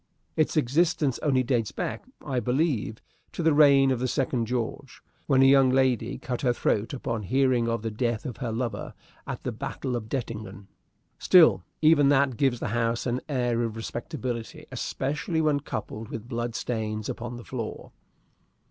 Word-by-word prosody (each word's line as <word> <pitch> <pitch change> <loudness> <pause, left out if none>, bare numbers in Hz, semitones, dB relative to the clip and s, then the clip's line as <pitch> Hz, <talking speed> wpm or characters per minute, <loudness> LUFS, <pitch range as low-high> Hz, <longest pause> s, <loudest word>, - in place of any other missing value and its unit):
Its 155 0 +1
existence 150 0 +2
only 130 -4 +2
dates 120 -4 0
back, - - -4 0.2
I 130 -2 0
believe, 125 -4 -1 0.3
to 170 - -3
the 160 -1 +4
reign 140 -2 +6
of 130 - 0
the 130 - 0
Second 125 -3 0
George, 125 +3 -4 0.3
when 135 -2 +5
a - - +7
young 135 -1 +6
lady 130 -2 +1
cut 125 -1 -4
her 125 -3 +2
throat 110 -2 0
upon 115 -4 -3
hearing 125 +2 +2
of 115 -1 -2
the 115 - -2
death 115 +2 -2
of 125 -6 -5
her 120 -3 -3
lover 115 +1 -4 0.3
at - - -5
the - - -2
battle 130 -2 -4
of 110 -2 -5
Dettingen. 105 -7 -5 0.5
Still, 155 - +6 0.2
even 150 -3 +6
that 140 -2 +3
gives 130 -2 +1
the - - -3
house 115 +1 0
an 125 0 -1
air 120 -4 0
of 115 -2 -2
respectability, 120 0 -5
especially 150 +6 -2
when 155 -2 +2
coupled 110 -4 -6
with 115 0 -7
blood 120 -1 -3
stains 110 -3 -3
upon 120 +1 -5
the 120 - -10
floor. 115 -4 -6
125 Hz, 170 wpm, -27 LUFS, 115-140 Hz, 0.5 s, a